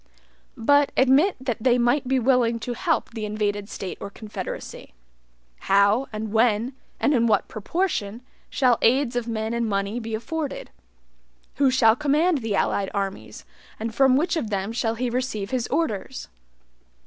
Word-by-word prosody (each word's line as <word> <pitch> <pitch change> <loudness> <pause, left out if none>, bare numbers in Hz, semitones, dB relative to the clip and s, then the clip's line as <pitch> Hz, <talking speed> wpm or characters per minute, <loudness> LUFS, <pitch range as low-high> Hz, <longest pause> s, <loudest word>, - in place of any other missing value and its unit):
But 285 +5 +3
admit 270 +9 +4
that 245 -4 -3
they 245 +1 +3
might 245 +3 +1
be 265 +1 +2
willing 245 -2 +2
to 245 - -3
help 325 +2 -1
the 225 -2 -6
invaded 205 -1 -2
State 190 - -6
or - - -5
confederacy. 210 - -8 0.7
How, 200 +6 +4
and 215 0 -5
when, 230 +2 +2 0.3
and 295 - +2
in 235 -3 +3
what 210 -3 +2
proportion 225 - -2 0.3
shall 250 -3 +2
aids 250 +1 +2
of 240 -1 -2
men 220 0 -2
and 235 -1 -1
money 200 +3 -1
be 225 -1 -4
afforded? 295 +6 -5 0.9
Who 280 -2 +4
shall 230 -4 +4
command 300 +4 +2
the 220 -4 -2
allied 195 0 0
armies, 195 -1 -4 0.3
and 225 +1 -4
from 265 +1 +4
which 335 +4 0
of 280 -10 -2
them 200 0 -2
shall 230 -1 -1
he 250 +2 -2
receive 245 -5 -3
his 250 -2 -1
orders? 255 - -2
235 Hz, 160 wpm, -24 LUFS, 215-265 Hz, 0.9 s, admit